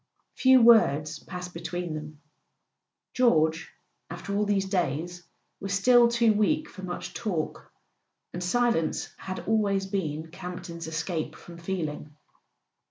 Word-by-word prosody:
Few 260 -1 +6
words 155 -10 +5
passed 180 +1 -8
between 170 0 -4
them. 150 -1 -8 0.9
George, 160 -9 +2 0.4
after 200 - -5
all 210 +1 +2
these 200 -2 +1
days, 175 -2 -2 0.4
was 195 0 -4
still 240 +4 +6
too 235 -2 +3
weak 305 +9 +1
for 190 - -11
much 185 -1 -6
talk; 175 -8 -4 0.6
and 175 - -4
silence 230 -5 0
had 185 0 -7
always 200 -3 +1
been 160 -5 -3
Campton's 180 -2 -7
escape 160 -1 -3
from 170 -1 -12
feeling. 155 -4 -4
180 Hz, 120 wpm, -27 LUFS, 160-205 Hz, 0.9 s, Few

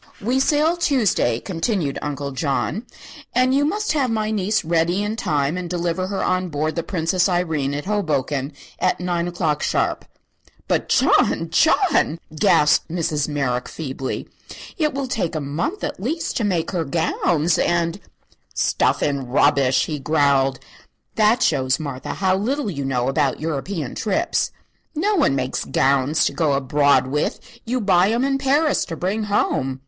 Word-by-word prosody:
"We 245 +6 0
sail 305 +5 +2
Tuesday," 220 - +1
continued 170 - -2
Uncle 140 -1 -4
John, 150 - -2 0.5
"and 255 +1 +3
you 280 +1 +3
must 420 +7 -1
have 275 -4 +1
my 215 -1 -1
niece 210 -2 0
ready 170 +4 +1
in 210 +1 -2
time 150 -5 -1
and 180 -1 -5
deliver 175 +1 -1
her 195 0 -2
on 185 0 0
board 155 +1 -2
the 170 - 0
'Princess 175 +1 0
Irene' 160 -6 0
at 145 - -4
Hoboken 150 -8 -1 0.3
at 185 - +1
nine 175 -1 -1
o'clock, 160 -4 -1
sharp." - - 0 0.6
"But - - 0
John - - +2
John!" 160 - +3 0.2
gasped 150 -1 +3
Mrs. 160 -3 -1
Merrick, 135 -5 -2
feebly, 135 -4 -5 0.5
"it 305 -6 0
will 275 0 -2
take 185 -9 -2
a - - 0
month, 150 - -3
at 290 0 -3
least, 315 - -2
to 230 - -1
make 175 -5 0
her 175 -4 -1
gowns, 160 +1 0
and 170 +1 0 0.3
" - - -33
"Stuff - - +1
and 140 -4 -2
rubbish!" 135 -1 +3
he 150 -2 -4
growled. 140 -2 +2 0.6
"That 220 +3 +3
shows, 130 -3 +1
Martha, 140 -4 -5
how 190 -1 +1
little 235 +2 -1
you 140 -4 -4
know 125 -2 0
about 135 -1 0
European 155 -1 -3
trips. 325 +11 0 0.5
No 395 +8 +1
one 300 - +2
makes 130 -1 -2
gowns 140 +3 +2
to - - 0
go 155 -4 +1
abroad 140 +1 +3
with; 145 +3 -1 0.3
you 250 +2 -1
buy 190 -3 +3
'em 235 +3 +1
in 275 0 +1
Paris 285 +3 +2
to 165 - -6
bring 205 +6 -1
home." 135 -10 0
170 Hz, 160 wpm, -21 LUFS, 145-215 Hz, 0.6 s, and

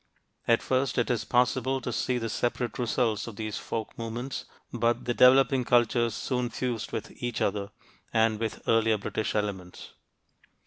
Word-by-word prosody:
At 115 -1 +3
first 130 0 0
it 120 0 +2
is 120 - -1
possible 130 +2 +2
to 125 -1 -4
see 125 +2 0
the 115 -1 -2
separate 120 0 -2
results 115 -2 0
of 115 - -7
these 110 -1 -4
folk 110 -2 -5
movements, 120 +4 -4 0.3
but 120 0 0
the 120 - 0
developing 130 +1 +5
cultures 120 -1 +2
soon 125 -2 -1
fused 120 -3 -3
with - - -4
each 120 -2 -2
other 100 0 -1 0.4
and 110 -1 +2
with 115 -1 -4
earlier 115 -1 +3
British 105 +2 -3
elements. 95 -4 -4
120 Hz, 160 wpm, -28 LUFS, 110-125 Hz, 0.4 s, developing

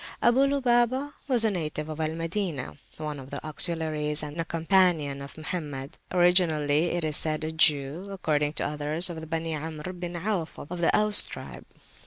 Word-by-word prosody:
Abu 260 +4 +4
Lubabah 260 0 +1
was 250 -5 +3
a 220 - +3
native 155 -4 -3
of 155 0 -7
Al 160 0 -1
Madinah, 165 -4 -3 0.2
one 150 -2 -5
of 135 0 -11
the - - -5
Auxiliaries 155 -1 0
and 150 +3 -4
a - - -4
companion 165 -5 +2
of 140 +2 -10
Mohammed, 150 -4 -5
originally 170 -4 +3
it 175 0 -1
is 155 -1 0
said 155 0 +2
a 155 - -3
Jew, 155 +3 +2
according 150 -6 0
to - - -1
others 150 +4 +1
of 160 -1 -7
the 160 - -8
Beni 165 0 -2
Amr 155 +3 -5
bin 175 -1 -6
Auf 180 -2 -3
of 175 +4 -7
the 170 - +3
Aus 210 -1 +7
tribe. - - -8
160 Hz, 180 wpm, -27 LUFS, 150-180 Hz, 0.2 s, Aus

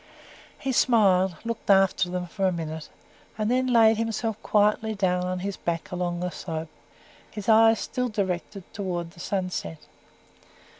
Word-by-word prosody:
He 270 - -2
smiled, 195 -8 +3
looked 230 -2 -5
after 195 -2 +4
them 180 0 -3
for 190 +2 -1
a - - +2
minute, 160 -2 -5 0.5
and 215 +1 0
then 255 +1 +2
laid 225 -3 +5
himself 225 -1 -2
quietly 210 +1 +2
down 180 -2 0
on 180 0 -3
his 200 +1 -4
back 165 -1 -3
along 175 -1 -2
the 180 0 -2
slope, 160 -2 -5 0.6
his 210 -2 -8
eyes 225 0 +6
still 250 -2 -2
directed 195 -2 -3
towards 175 -4 -4
the - - -17
sunset. 180 - -3
195 Hz, 150 wpm, -26 LUFS, 180-220 Hz, 0.6 s, eyes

